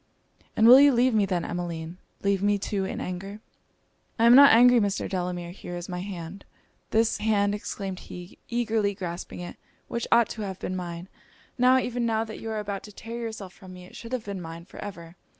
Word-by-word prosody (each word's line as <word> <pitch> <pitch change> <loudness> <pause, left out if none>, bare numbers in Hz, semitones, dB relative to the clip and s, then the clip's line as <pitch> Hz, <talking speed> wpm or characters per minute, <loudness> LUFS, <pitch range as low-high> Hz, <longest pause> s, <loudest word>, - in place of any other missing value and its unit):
'And 220 - +5
will 255 +3 +10
you 285 0 +7
leave 250 0 +3
me, 210 -2 +2
then, 180 -3 -1
Emmeline? 170 0 -5 0.2
leave 200 -1 +1
me 205 0 +2
too 200 -1 -2
in 190 - -4
anger?' 195 +3 -6 0.8
'I 230 - +3
am 235 +1 +8
not 280 +1 +9
angry, 245 +2 +7
Mr. 205 -2 -1
Delamere 180 -2 -3
here 175 -1 -8
is 175 - -7
my 180 -1 -5
hand.' 185 0 -7 0.5
'This 225 0 +2
hand,' 205 -2 +2
exclaimed 195 -2 -5
he, 180 0 -11
eagerly 225 -4 0
grasping 175 -2 -6
it, 175 - -8 0.3
'which 235 - -3
ought 235 -1 +5
to 220 - -6
have 190 -3 -4
been 185 - -4
mine! 175 -1 -6 0.5
Now, 255 0 +5
even 245 -1 -1
now, 225 -1 +1
that 220 -1 -8
you 225 - -6
are 220 - -3
about 200 -2 -4
to 210 - -11
tear 230 +3 -8
yourself 220 -5 -6
from 185 -2 -13
me, 180 0 -11
it - - -15
should 230 - -9
have 250 -3 -3
been 200 -2 -5
mine 165 0 -8
for - - -13
ever! 170 -4 -9
200 Hz, 210 wpm, -26 LUFS, 180-225 Hz, 0.8 s, will